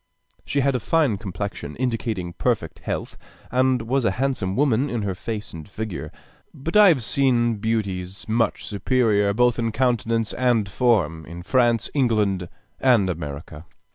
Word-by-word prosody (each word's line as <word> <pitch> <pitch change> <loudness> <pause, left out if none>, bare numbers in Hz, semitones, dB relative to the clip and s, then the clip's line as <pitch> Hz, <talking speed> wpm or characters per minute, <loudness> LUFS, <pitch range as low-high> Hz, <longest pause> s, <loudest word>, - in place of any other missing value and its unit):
She 140 - 0
had 140 +1 +2
a 125 - 0
fine 135 -5 +1
complexion, 95 -6 -5
indicating 115 -8 -2
perfect - - -1
health, - - -5 0.3
and 130 -1 +2
was 130 +3 0
a 115 - +3
handsome 125 -8 -1
woman 135 0 +2
in 120 -3 -2
her 100 -2 -1
face 105 +3 -6
and 80 +3 -9
figure. 95 -9 -5 0.4
But 165 +7 -5
I 210 -1 +8
have 150 -10 +4
seen 120 -3 +2
beauties 100 -4 -3
much 115 +1 0
superior, 105 -1 +1
both 120 +3 +2
in 115 -1 0
countenance 115 -2 0
and 120 -5 +1
form, 95 -7 +1
in 85 +2 -8
France, 120 +1 +2
England, 105 - +1 0.3
and 115 -8 +3
America. 75 0 -7
115 Hz, 150 wpm, -23 LUFS, 95-125 Hz, 0.4 s, I